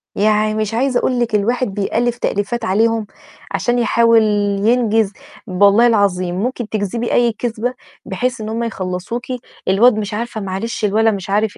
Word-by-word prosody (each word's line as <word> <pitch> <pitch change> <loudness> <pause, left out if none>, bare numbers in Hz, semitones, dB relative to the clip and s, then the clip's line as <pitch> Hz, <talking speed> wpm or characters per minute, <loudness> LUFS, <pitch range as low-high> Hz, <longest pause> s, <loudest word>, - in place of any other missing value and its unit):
يعني 215 +1 +2
مش 215 0 -2
عايزة 255 +1 +1
أقول 250 -1 0
لِك 235 -2 0
الواحد 240 +5 +1
بيألّف 235 +4 -1
تأليفات 225 +2 -2
عليهم 225 +2 +1 0.4
عشان 240 0 0
يحاول 230 -1 +4 0.4
ينجز، 225 -3 +2 0.3
ب 185 +1 -5
والله 205 +4 +6
العظيم 185 -5 +1
ممكن 240 +2 -3
تكذبي 220 +3 -2
أي 240 -1 +3
كذبة 235 +2 -3 0.3
بحيث 240 +4 -2
إن 215 - -5
هُم 230 +1 -2
يخلصوكِ، 195 +2 -4 0.4
الواد 215 +5 +5
مش 210 0 -3
عارفة 225 0 -4
معلش 195 +3 -3
الولا 220 +2 +3
مش 195 -2 -5
عارف 210 +1 0
220 Hz, 155 wpm, -18 LUFS, 205-235 Hz, 0.4 s, والله